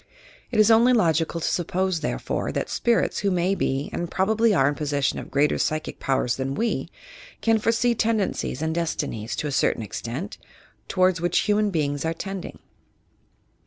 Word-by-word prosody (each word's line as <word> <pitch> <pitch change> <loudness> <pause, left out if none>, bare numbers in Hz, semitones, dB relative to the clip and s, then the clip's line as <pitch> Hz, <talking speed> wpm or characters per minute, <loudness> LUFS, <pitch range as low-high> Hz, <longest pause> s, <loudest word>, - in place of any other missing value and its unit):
It 225 - -1
is 215 +1 +6
only 235 +3 +6
logical 165 -6 +2
to - - -1
suppose, 185 0 0
therefore, - - -2
that - - -3
spirits 235 -1 +1
who 200 - +1
may 180 +1 +1
be 135 -7 -1
and 175 - -3
probably 220 +5 +2
are 140 -9 +3
in 145 - +1
possession 145 -2 -1
of - - -9
greater 145 +2 +2
psychic 155 0 -2
powers 130 -3 0
than 135 +1 -2
we, 230 +8 -1 0.5
can 225 -1 +3
foresee 230 +2 +2
tendencies 215 - -1
and 160 0 0
destinies, 120 -9 -2
to 150 - -3
a - - -3
cer - - +2
tain - - -6
extent, 120 - -6 0.5
towards 185 -2 +2
which 175 0 +2
human 210 0 +2
beings 145 -5 -1
are 165 0 -1
tending. 195 +1 -6
175 Hz, 170 wpm, -24 LUFS, 145-210 Hz, 0.5 s, is